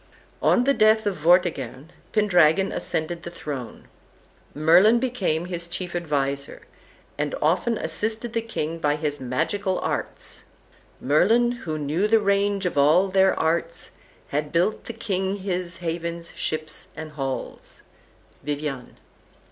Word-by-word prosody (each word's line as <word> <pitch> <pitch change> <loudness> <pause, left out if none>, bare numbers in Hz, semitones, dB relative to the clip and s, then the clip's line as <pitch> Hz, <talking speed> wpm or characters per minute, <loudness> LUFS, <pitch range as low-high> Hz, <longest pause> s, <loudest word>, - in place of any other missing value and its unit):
On 245 - +4
the 275 +2 +3
death 220 -2 +4
of 200 -3 -1
Vortigern, 155 -4 +1 0.2
Pendragon 190 -3 +3
ascended 165 +2 -2
the 170 - -7
throne. 140 -8 -7 0.7
Merlin 180 +9 +5
became 200 -10 -1
his 175 -1 -4
chief 180 0 -5
adviser, 140 -4 -2 0.6
and 145 -1 -1
often 180 +9 +1
assisted 225 +2 -2
the 230 - 0
king 165 -8 -4
by 145 -2 +1
his 150 -2 -3
magical 165 +10 -1
arts. - - -4 0.6
"Merlin, 220 - +3
who 170 -11 -5
knew 155 +7 0
the 225 +1 +4
range 200 -1 +1
of 170 -5 0
all 165 +7 +4
their 190 0 +3
arts, 165 +1 -1 0.4
Had 150 +1 -2
built 175 +6 +1
the 235 - -6
King 195 -4 -1
his 185 -3 -3
havens, 170 0 -4
ships 155 0 -2
and 155 0 -7
halls." 135 -3 -6 0.6
Vivian. 145 -3 -5
170 Hz, 130 wpm, -24 LUFS, 150-200 Hz, 0.7 s, Merlin